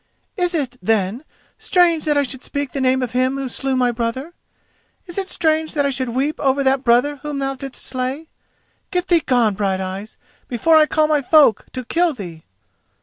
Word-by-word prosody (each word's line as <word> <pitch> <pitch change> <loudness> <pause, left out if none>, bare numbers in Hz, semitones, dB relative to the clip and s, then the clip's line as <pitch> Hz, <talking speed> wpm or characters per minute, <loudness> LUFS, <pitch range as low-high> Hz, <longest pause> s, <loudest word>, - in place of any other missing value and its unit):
"Is 355 -3 0
it, 260 -5 -2
then, 215 +4 0 0.4
strange 345 -4 +2
that 300 -1 +2
I 285 - +3
should 260 -1 -6
speak 285 -3 -4
the 275 - -3
name 260 0 +2
of 245 - -3
him 255 +2 +1
who 270 -1 -3
slew 265 +2 -2
my 250 -1 +2
brother? 240 +7 -4 0.7
Is 345 -2 -8
it 385 - -3
strange 315 -2 0
that 285 -1 +1
I 280 - +1
should 260 -1 -2
weep 270 +6 -1
over 275 0 +1
that 265 0 +2
brother 250 +5 +3
whom 295 0 -5
thou 270 0 -1
didst 270 0 -6
slay? 260 +5 -3 0.6
Get 360 0 -2
thee 345 -2 +5
gone, 240 -5 +2
Brighteyes, 195 +1 -3 0.3
before 315 +7 +2
I 310 -1 +6
call 310 0 +2
my 305 -1 +2
folk 285 -5 +4
to 255 -1 -5
kill 340 +4 +1
thee!" 170 -7 -9
270 Hz, 195 wpm, -20 LUFS, 245-305 Hz, 0.7 s, I